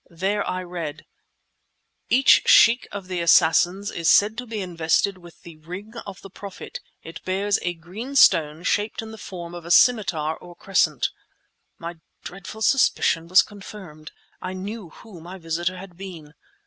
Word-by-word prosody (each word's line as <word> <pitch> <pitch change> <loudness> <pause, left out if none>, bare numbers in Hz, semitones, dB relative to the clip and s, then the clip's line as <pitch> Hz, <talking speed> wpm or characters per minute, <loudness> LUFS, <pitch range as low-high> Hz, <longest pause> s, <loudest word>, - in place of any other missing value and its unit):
There 195 +4 -1
I 185 0 -3
read— 170 -4 -6 1.0
Each 260 +2 +6
Sheikh 235 +2 +6
of 200 -2 -7
the 180 -1 -3
Assassins 175 +4 +3
is 165 -2 0
said 210 +2 +5
to 250 - -7
be 220 -1 -5
invested 180 +1 0
with 175 -1 -16
the 170 -3 -12
"Ring 180 +8 -9
of 195 -1 -9
the 195 - -10
Prophet." 200 -1 -9 0.2
It 165 - -10
bears 195 +2 0
a 175 0 -2
green 200 +12 -8
stone, 155 - +4
shaped 210 +3 -1
in 220 - -9
the 220 - -11
form 175 -3 -8
of 175 -1 -8
a 170 - -9
scimitar 175 -6 +3
or 175 -1 -14
crescent. 160 -9 +1 0.7
My 170 0 -7 0.3
dreadful 195 +4 -8
suspicion 165 -11 +2
was 185 +2 +6
confirmed. 190 -7 -11 0.3
I 185 - -5
knew 195 0 -7
who 185 0 -14
my 180 +3 -9
visitor 170 +1 -3
had 180 -1 -11
been. 170 -6 -10
185 Hz, 160 wpm, -23 LUFS, 170-205 Hz, 1.0 s, Each